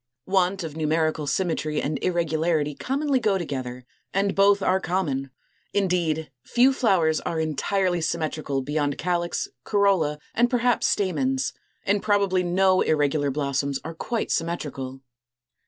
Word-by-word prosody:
Want 190 0 +1
of 155 -2 -6
numerical 155 -1 0
symmetry 155 -2 -1
and 145 0 -3
irregularity 160 -3 +1
commonly 275 - 0
go 210 -5 +2
together; 130 -7 -5 0.3
and 195 0 +2
both 200 0 +4
are 185 +1 +3
common. 150 -8 -1 0.5
Indeed, 175 -5 0
few 255 +3 +4
flowers 185 - +2
are 165 - -3
entirely 175 +4 0
symmetrical 155 -4 -2
beyond 145 0 -1
calyx, 175 0 -1 0.2
corolla, 190 -7 +2 0.2
and 240 +1 +3
perhaps 245 -1 +2
stamens; 135 -9 0 0.3
and 200 0 +1
probably 200 -3 +2
no 185 +1 +3
irregular 145 -1 +1
blossoms 140 0 -1
are 165 - -5
quite 225 +7 -3
symmetrical. 140 -6 -3
165 Hz, 125 wpm, -25 LUFS, 150-195 Hz, 0.5 s, both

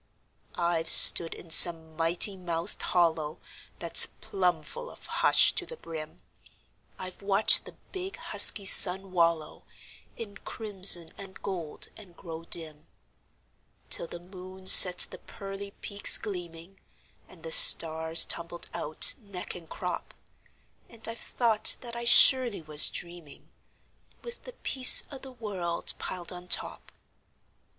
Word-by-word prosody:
I've 170 -2 -6
stood 165 -1 +5
in 165 - -16
some 160 -1 +5
mighty 170 +5 -1
mouthed 175 0 -7
hollow 160 -3 -5 0.4
That's - - +3
plumb 180 -5 -7
full 485 - -13
of - - -17
hush - - 0
to - - -6
the 485 - -13
brim; 160 - -14 0.7
I've 185 +1 -12
watched 200 +1 +1
the - - -17 0.2
big, 380 +1 -11
husky 200 - -1
sun 190 0 +3
wallow 170 -3 -6 0.5
In 205 -3 -13
crimson 190 -7 +2
and 195 -1 -15
gold, 175 -6 -9
and 185 -5 -19
grow 165 -1 -14
dim, 155 -3 -3 1.0
Till - - -2
the 175 - -13
moon 185 +1 -18
set 180 -1 +7
the - - -14
pearly 195 0 -14
peaks 200 -1 -4
gleaming, 175 -2 -13 0.5
And - - -20
the 485 - -10
stars 165 - +3
tumbled 170 0 -6
out, 155 +1 -3
neck 200 -5 -11
and 170 -3 -15
crop; 180 -1 -11 0.7
And 225 -1 -6
I've 230 0 -11
thought 225 -3 -1
that 235 -2 -12
I 235 0 -10
surely 245 -5 +3
was 150 -1 -1
dreaming, 170 -4 -15 0.7
With 475 0 -13
the - - -13
peace 260 - +4
o' 275 - -12
the 265 0 -16
world 190 -8 -7
piled 180 -2 -10
on 180 0 -14
top. - - 0
180 Hz, 135 wpm, -23 LUFS, 165-205 Hz, 1.0 s, set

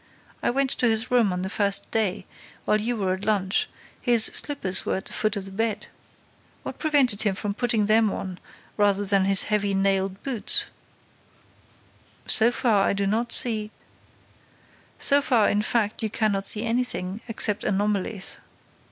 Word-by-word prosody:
I - - 0
went 270 +2 0
to 245 - +1
his 225 +2 0
room 235 -5 +3
on 180 0 -4
the - - -3
first 200 -1 +2
day, 205 -3 0 0.4
while 215 0 +1
you 235 +2 -2
were 190 -3 -1
at 190 +1 -7
lunch: 205 -2 0 0.3
his 235 -3 +4
slippers 190 -11 0
were - - -2
at 190 - -6
the - - -6
foot 215 0 -1
of 200 -2 -5
the 195 - -10
bed. 220 +1 -2 0.7
What - - -8
prevented 275 -9 +1
him 205 -3 0
from 205 +1 -4
putting 225 -1 0
them 215 +1 +3
on 185 -2 -6 0.4
rather 205 -1 +1
than 195 -1 +1
his 195 -1 +4
heavy 205 -2 -1
nailed 195 0 0
boots?" 255 -6 +2 1.6
"So 230 +1 +5
far, 220 -5 +1
I - - +1
do 200 0 -2
not 225 +4 -1
see—" 215 -3 +1 1.3
"So 280 +1 +3
far, 240 -6 +2
in 205 - 0
fact, 215 0 -1
you 220 - -1
cannot 200 -2 -1
see 215 +2 +3
anything, 230 -4 -2
except 215 -2 -1
anomalies. 200 -1 -1
210 Hz, 165 wpm, -24 LUFS, 195-230 Hz, 1.6 s, So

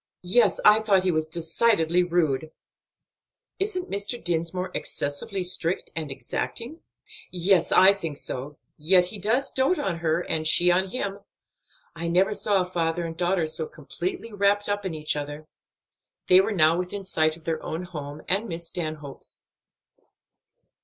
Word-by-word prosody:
"Yes, 190 +7 +3
I 210 +1 +8
thought 200 -4 +2
he 185 - +2
was 155 -1 -1
decidedly 170 +1 +2
rude." 160 -4 0 1.1
"Isn't 385 -2 -2
Mr. 200 +4 -2
Dinsmore 175 +2 -1
excessively 165 +7 -3
strict 180 -1 -2
and 160 -2 -3
exacting?" 235 - -4 0.5
"Yes, 180 -1 +2
I 190 +2 +7
think 165 -7 -5
so; 140 +3 -5 0.2
yet 180 +4 +4
he 200 +3 -5
dotes 235 +8 0
on 260 - +1
her, 165 0 +1
and 155 -2 -2
she 175 +2 +5
on 185 +2 +1
him. 200 -3 -3 0.8
I 170 0 -4
never 185 +5 +2
saw 205 -2 +1
a - - -6
father 170 -1 -1
and 165 0 -5
daughter 175 0 +1
so 155 - 0
completely 370 - -6
wrapped 205 0 +2
up 205 -1 -1
in 170 - -5
each 155 -1 -1
other." 145 +1 -5 0.8
They 185 +1 +7
were 195 - -2
now 165 -3 +3
within 180 +2 -4
sight 155 -4 +1
of 165 - -19
their 160 -1 -2
own 160 +3 -4
home, 150 -4 -8
and 200 +4 +1
Miss 170 0 -3
Stanhope's. 155 -5 -6
180 Hz, 155 wpm, -25 LUFS, 160-200 Hz, 1.1 s, I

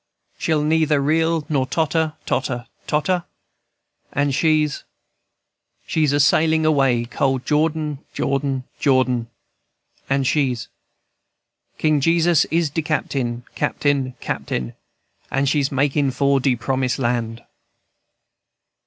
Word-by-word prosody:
She'll 155 -2 +1
neither 155 -1 +2
reel 160 +2 +1
nor 135 -4 0
totter, 160 0 0
totter, 125 -3 -2 0.2
totter, 170 +4 0 0.9
And 145 0 0
she's, 155 0 +2
&c. - - -22 1.0
She's 155 -3 +1
a 145 - +2
sailin' 160 +2 +3
away 135 -6 +2
cold 130 +1 -1
Jordan, 150 -1 0
Jordan, 135 -1 -1 0.2
Jordan, 130 -4 +2 0.8
And 135 0 +1
she's, 130 -4 +1
&c. - - -16 1.1
King 155 -2 +2
Jesus 165 +1 +3
is 165 -2 0
de 160 - -1
captain, 130 -6 -2
captain, 135 -3 0
captain, 60 -1 -3 0.6
And 135 +1 0
she's 140 -1 +1
makin' 140 +1 +1
for 140 +1 +2
de 130 -1 +2
Promise 130 +1 -1
Land." 120 -2 -2
140 Hz, 110 wpm, -21 LUFS, 130-155 Hz, 1.1 s, sailin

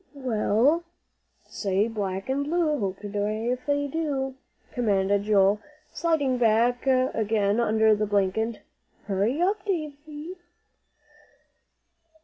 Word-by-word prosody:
"Well, 255 +4 +1 0.6
say 200 +1 0
'black 195 -2 -3
and 270 +2 0
blue 310 -1 +1
hope 195 -2 -3
to 210 - -6
die 210 +3 -1
if 255 +3 -8
I 285 0 +1
do,'" 280 -3 -2 0.4
commanded 200 -3 +1
Joel, 205 -1 +4 0.3
sliding 290 -7 +1
back 240 +3 +2
again 225 -5 +2
under 220 -1 +4
the 210 0 0
blanket. 205 +3 0 0.4
"Hurry 205 +8 0
up, 395 +2 0
Dave." 325 -8 -2
225 Hz, 110 wpm, -26 LUFS, 205-280 Hz, 0.6 s, Joel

